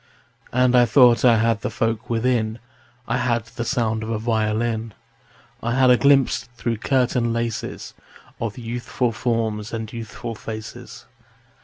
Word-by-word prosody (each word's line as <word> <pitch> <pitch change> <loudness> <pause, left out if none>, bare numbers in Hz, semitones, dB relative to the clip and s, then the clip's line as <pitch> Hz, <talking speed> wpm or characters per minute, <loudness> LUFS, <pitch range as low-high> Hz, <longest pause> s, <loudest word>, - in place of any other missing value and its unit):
And 125 0 +3
I 120 -1 +6
thought 120 0 +5
I 120 -3 +6
had 115 -1 +1
the - - -2
folk 115 +1 -2
within: 115 -1 0 0.5
I - - 0
had 120 -3 0
the 115 +1 -6
sound 115 -3 0
of 110 - -5
a 115 - -1
violin; 110 0 -1 0.7
I 120 +1 -1
had 130 -1 +5
a - - +7
glimpse 140 -1 +3
through 115 -1 -2
curtain 125 -1 +1
laces 115 -1 -4 0.5
Of 115 -1 -4
youthful 120 +1 -2
forms 110 -2 -2
and 110 -1 -5
youthful 115 0 -6
faces. 110 0 -8
115 Hz, 145 wpm, -22 LUFS, 110-120 Hz, 0.7 s, a